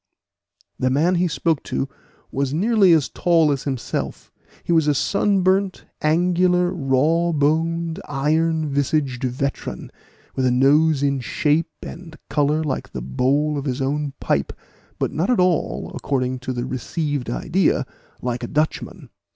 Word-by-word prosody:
The 130 - +2
man 155 +7 +2
he 180 0 +2
spoke 165 -1 0
to 135 - -2 0.4
was 140 +1 -1
nearly 200 +1 +4
as 155 -6 +4
tall 165 -3 +2
as 140 -1 -2
himself; 130 -4 -4 0.3
he - - -3
was 160 -2 +3
a 145 - +3
sunburnt, 195 +2 +1 0.2
angular, 180 +2 +2
raw 155 +4 +2
boned, 165 +2 0
iron 155 +3 +1
visaged 140 -2 0
veteran, 130 +2 -3 0.4
with 130 -1 +1
a - - +3
nose 145 +3 +4
in 140 -1 +1
shape 150 +6 0
and 165 -1 -9
color 150 +2 +2
like 145 -4 -4
the 65 - -4
bowl 140 - +1
of 140 - -6
his 130 -1 -2
own 140 +1 -1
pipe, - - 0 0.4
but - - -1
not 170 +9 -1
at 245 - +3
all, 180 -2 0
according 130 -2 -1
to 130 +1 -4
the 120 -1 -3
received 145 +1 -3
idea, - - +1 0.4
like 125 -1 -2
a - - -4
Dutchman. 155 +1 -2
150 Hz, 145 wpm, -22 LUFS, 135-165 Hz, 0.4 s, nearly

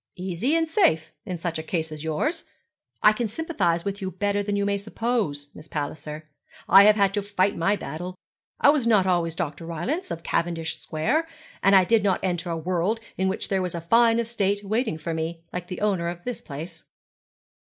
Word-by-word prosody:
'Easy, 185 - -1
and 330 0 +2
safe, 315 - +2 0.2
in 180 -2 -3
such 165 -1 -3
a - - -2
case 160 0 -2
as 155 0 -7
yours. 300 - -1 0.6
I 215 - +8
can 230 +1 -1
sympathize 205 - -1
with 200 +1 -3
you 190 - -2
better 200 +3 0
than 205 0 -2
you 200 0 +1
may 200 0 0
suppose, 205 -9 -2
Miss 155 - -11
Palliser. 150 +1 -5 0.4
I 195 +1 +9
have 210 0 +7
had 200 -2 +3
to 205 - 0
fight 200 -1 +1
my 195 +5 +2
battle. 175 +2 -6 0.4
I - - +6
was 280 -6 0
not 210 -5 +4
always 170 -3 +1
Dr. 165 -1 -4
Rylance, 255 - -3
of 165 - -5
Cavendish 165 -1 -1
Square; 250 - 0 0.3
and 195 0 +5
I 190 - +7
did 220 +2 +3
not 195 -2 +2
enter 175 -2 -1
a 165 - -1
world 180 +6 0 0.2
in 190 - 0
which 190 - -1
there 195 -1 +1
was 180 -2 -3
a - - -2
fine 230 +6 +4
estate 205 -3 0
waiting 220 -3 0
for 165 +1 -4
me, 165 +1 -4
like 180 0 -4
the 180 - -6
owner 195 -5 +1
of 175 0 -5
this 245 -2 -4
place.' 160 +3 -8
185 Hz, 205 wpm, -25 LUFS, 165-210 Hz, 0.6 s, I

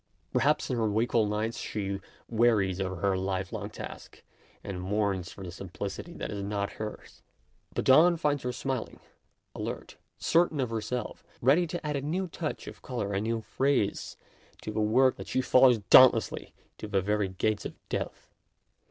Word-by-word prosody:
Perhaps - - +2
in 125 - 0
her 110 -2 +1
wakeful 110 +1 +2
nights 110 +2 -2
she 100 -2 -3 0.3
wearies 110 -5 +2
of 95 -3 -3
her 100 -1 +3
life 95 +1 -2
long 105 -2 -4
task, 110 - -9 0.4
and 95 -3 -5
mourns 100 -2 -1
for 95 - -10
the 90 - -6
simplicity 95 - -6
that - - -5
is 100 -1 -4
not 100 0 -2
hers. 105 -1 -7 0.5
But - - -1
dawn 165 +6 +6
finds 145 -3 0
her 125 - -2
smiling, 130 -1 -4 0.5
alert, - - -6 0.2
certain 165 -3 +2
of 125 -3 -1
herself, 115 +1 -3 0.2
ready 150 +8 +4
to 175 0 -5
add 150 -1 -1
a - - -3
new 175 +7 -1
touch 160 -2 -4
of - - -10
colour, 115 -6 -3
a 100 - 0
new 115 +1 -1
phrase, 130 -3 0 0.5
to 110 - -4
the 110 0 -1
work 130 +5 +4
that - - -8
she - - 0
follows 125 -1 +6
daunt 130 -2 +10
lessly 115 - -4 0.3
to - - -5
the 100 -2 +1
very 105 0 +1
gates 105 +3 -1
of - - -6
death. - - -5
110 Hz, 175 wpm, -29 LUFS, 100-130 Hz, 0.5 s, daunt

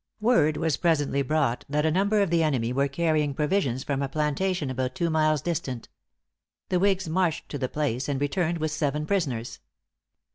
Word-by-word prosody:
Word 165 -10 +3
was 160 -3 0
presently 145 -5 +1
brought 140 -3 0
that 150 +2 +1
a 160 - +3
number 200 +4 +2
of 190 - -2
the 170 -1 +3
enemy 125 -7 0
were 140 +2 +2
carrying 150 -1 0
provisions 150 -5 0
from 140 -1 -2
a 140 - -2
plantation 150 +1 -1
about 130 0 -2
two 170 -2 0
miles 155 -2 +2
distant. 135 -8 -3 0.8
The 180 - +2
whigs 190 -1 +1
marched 165 -1 0
to 145 - -5
the 130 -1 -2
place, 140 -3 -2
and 140 -2 -1
returned 170 +4 0
with 155 -1 -2
seven 150 -1 -1
prisoners. 140 - -2
150 Hz, 180 wpm, -26 LUFS, 140-170 Hz, 0.8 s, Word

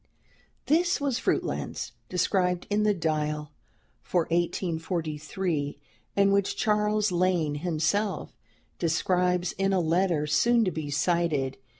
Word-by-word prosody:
This 345 +4 +2
was 280 -4 0
"Fruitlands," - - -2 0.2
described 180 0 +1
in 205 +1 +2
the 210 0 +3
"Dial" 150 -3 -1 0.5
for 180 - +1
1843, 165 -2 -2 0.4
and 200 0 +4
which 200 -1 +1
Charles 210 -1 +1
Lane 175 -4 +1
himself 175 +6 -1 0.4
describes 180 +1 +1
in 195 0 +2
a 190 - +3
letter 170 -2 +1
soon 230 +10 +3
to 185 - 0
be 155 -2 -4
cited. 150 -3 0
180 Hz, 110 wpm, -27 LUFS, 155-200 Hz, 0.5 s, and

